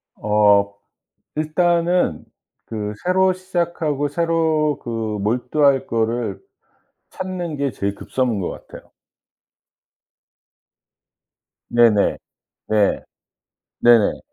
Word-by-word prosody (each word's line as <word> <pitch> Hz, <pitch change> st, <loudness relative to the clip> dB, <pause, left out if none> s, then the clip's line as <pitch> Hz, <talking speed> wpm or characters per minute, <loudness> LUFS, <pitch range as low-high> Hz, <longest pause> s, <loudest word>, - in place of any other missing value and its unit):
어 105 Hz, -1 st, +3 dB, 0.6 s
일단은 170 Hz, -, +1 dB, 0.4 s
그 105 Hz, -2 st, -4 dB
새로 185 Hz, +1 st, +3 dB
시작하고 170 Hz, -6 st, -2 dB
새로 160 Hz, -1 st, 0 dB
그 -, -, -10 dB, 0.3 s
몰두할 130 Hz, +5 st, +1 dB
거를 115 Hz, +1 st, -1 dB, 0.7 s
찾는 180 Hz, -5 st, -5 dB
게 140 Hz, -2 st, -1 dB
제일 100 Hz, 0 st, -3 dB
급선무인 120 Hz, -6 st, -2 dB
것 -, -, -2 dB, 0.2 s
같아요. -, -, -13 dB, 2.8 s
네네. 115 Hz, -4 st, +4 dB, 0.5 s
네. 105 Hz, -2 st, +2 dB, 0.8 s
네네. 120 Hz, -3 st, +4 dB
140 Hz, 155 characters per minute, -20 LUFS, 110-170 Hz, 2.8 s, 네네